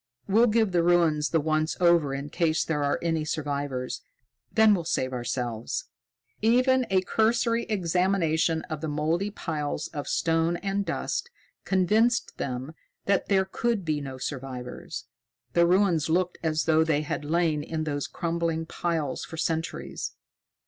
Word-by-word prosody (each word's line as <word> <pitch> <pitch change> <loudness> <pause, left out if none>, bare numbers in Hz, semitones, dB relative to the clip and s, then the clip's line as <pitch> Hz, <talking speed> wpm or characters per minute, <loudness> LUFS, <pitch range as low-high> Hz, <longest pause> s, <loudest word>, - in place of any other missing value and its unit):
We'll 220 +5 +5
give 220 -2 +2
the 175 -1 +3
ruins 165 -3 +3
the 165 - +2
once 155 +1 0
over 170 -5 +4
in 140 +1 -4
case 165 -2 +1
there 150 -3 -1
are 145 - +1
any 165 -2 0
survivors; 145 -4 -3 0.5
then 220 -2 +6
we'll 180 -4 0
save 130 -5 -1
ourselves." 120 -2 -3 0.5
Even 255 +3 +3
a 190 -1 +3
cursory 230 +2 +1
examination 175 -4 +1
of 155 -4 -6
the 160 - -2
mouldy 160 +6 0
piles 155 -7 -3
of 145 -3 -5
stone 165 +1 +1
and 195 +2 -1
dust 475 - -2 0.4
convinced 215 +6 +2
them 130 +3 -4 0.3
that 200 -2 +1
there 190 -1 +3
could 215 0 -1
be 155 -2 0
no 135 -2 -6
survivors. 130 -2 -6 0.5
The 170 0 +5
ruins 180 -4 +3
looked 180 +2 +1
as 155 -1 0
though 160 0 +4
they 155 -2 +1
had 155 0 -3
lain 160 0 +1
in 155 +1 -3
those 145 -2 -2
crumbling 165 -1 -2
piles 160 -5 -2
for 160 - -8
centuries. 165 0 -3
165 Hz, 150 wpm, -27 LUFS, 150-190 Hz, 0.5 s, then